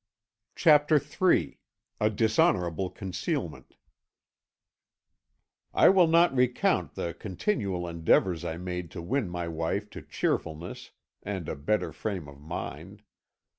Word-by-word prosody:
CHAPTER 150 -1 +5
III 165 +6 +1 0.4
A 105 - +3
DISHONOURABLE 95 -5 +1
CONCEALMENT 95 -2 -4 2.0
"I - - +7
will 185 -3 +5
not 170 -1 +4
recount 125 -1 +1
the 85 - -3
continual 95 - -2
endeavours 85 +1 +2
I 80 -1 -4
made 90 -1 -5
to - - -4
win 120 +1 -1
my 85 -1 -4
wife 85 +6 -3
to - - -8
cheerfulness 80 +3 -3 0.3
and 95 -5 -5
a - - -3
better 75 +10 -1
frame 95 -8 -4
of 70 0 -13
mind. 75 - -7
95 Hz, 115 wpm, -28 LUFS, 85-125 Hz, 2.0 s, I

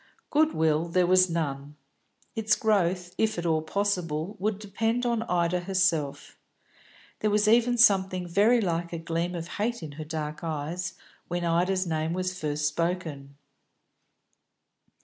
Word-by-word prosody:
Good 310 +1 +3
will 160 +1 +2
there 180 +1 +2
was 185 +1 +5
none; 145 -3 -3 0.6
its 220 0 +2
growth, 180 -4 +1
if 220 -2 +1
at 175 - -3
all 160 -2 +2
possible, 180 -1 -2
would 205 +1 0
depend 225 +4 -1
upon 235 -2 +1
Ida 180 -3 0
herself. 175 -6 -1 0.8
There 215 - +1
was 210 0 +2
even 240 +2 +4
something 190 -5 +4
very 210 +7 +4
like 170 -3 -1
a - - -2
gleam 165 +2 -2
of 170 -1 -5
hate 215 +2 -3
in 155 - -6
her 155 +2 -7
dark 155 0 -5
eyes 165 +3 -3 0.3
when 175 0 -2
Ida's 180 +3 +1
name 160 -1 -1
was 185 0 -2
first 150 -4 -1
spoken. 160 -4 -3
175 Hz, 145 wpm, -27 LUFS, 160-205 Hz, 0.8 s, was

